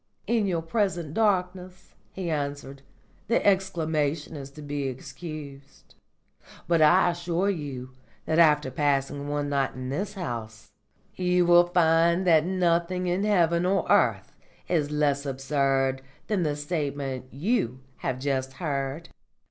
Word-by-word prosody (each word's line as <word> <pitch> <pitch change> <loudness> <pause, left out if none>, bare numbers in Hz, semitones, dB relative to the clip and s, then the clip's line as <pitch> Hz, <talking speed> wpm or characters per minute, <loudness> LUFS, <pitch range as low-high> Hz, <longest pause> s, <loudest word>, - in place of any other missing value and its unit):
"In 225 -3 +1
your 170 -3 -1
present 175 -4 -1
darkness," 185 -3 -1 0.2
he 180 -3 -4
answered, 140 -2 -4 0.5
"the 235 - +1
exclamation 160 -6 0
is 140 -2 -7
to 150 +2 -12
be 145 -1 -3
excused. 140 +1 -9 0.7
But 170 -2 +3
I 175 +3 +5
assure 175 +3 -1
you 135 -7 -6 0.3
that 160 +1 +1
after 150 -4 +4
passing 140 0 0
one 145 0 -2
night 140 -2 0
in 130 0 -5
this 195 +9 -3
house 115 - -6 0.4
you 180 -1 +2
will 175 0 +6
find 170 0 +3
that 165 -2 +4
nothing 180 0 +1
in 180 +3 0
heaven 170 -4 +3
or 190 +2 +1
earth - - +2 0.3
is 155 -4 0
less 145 -2 +1
absurd 135 -1 0 0.2
than 205 -4 0
the 150 -3 0
statement 145 -4 -4
you 135 - -1 0.2
have 130 - -3
just 130 -1 -2
heard." 140 +1 -3
155 Hz, 130 wpm, -26 LUFS, 140-180 Hz, 0.7 s, will